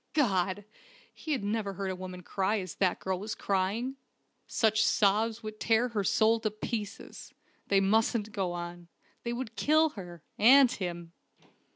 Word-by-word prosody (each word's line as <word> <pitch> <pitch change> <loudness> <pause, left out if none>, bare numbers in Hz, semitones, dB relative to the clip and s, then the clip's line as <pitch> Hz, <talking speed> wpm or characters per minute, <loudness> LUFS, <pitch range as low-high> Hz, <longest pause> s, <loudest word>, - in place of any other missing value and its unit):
God! 195 - +1 0.5
he 315 - -7
had 265 -8 0
never 205 -1 -2
heard 195 0 -3
a - - -4
woman 185 0 -8
cry 200 +4 0
as 185 -3 -6
that 185 -2 +1
girl 190 -1 -2
was 215 +3 -5
crying! 205 +7 -1 0.5
Such 220 -1 +2
sobs 220 +2 +2
would 215 0 -7
tear 230 +2 +2
her 215 -4 -1
soul 220 +3 +3
to 220 - -1
pieces. 215 0 -6 0.3
They 195 -1 +3
mustn't 220 +2 +1
go 190 -3 -2
on. 175 0 -7 0.3
They 235 - -3
would 240 -2 -5
kill 315 +2 +3
her 175 - -10 0.2
and 255 +3 +7
him! 175 -5 -5
205 Hz, 160 wpm, -30 LUFS, 190-225 Hz, 0.5 s, and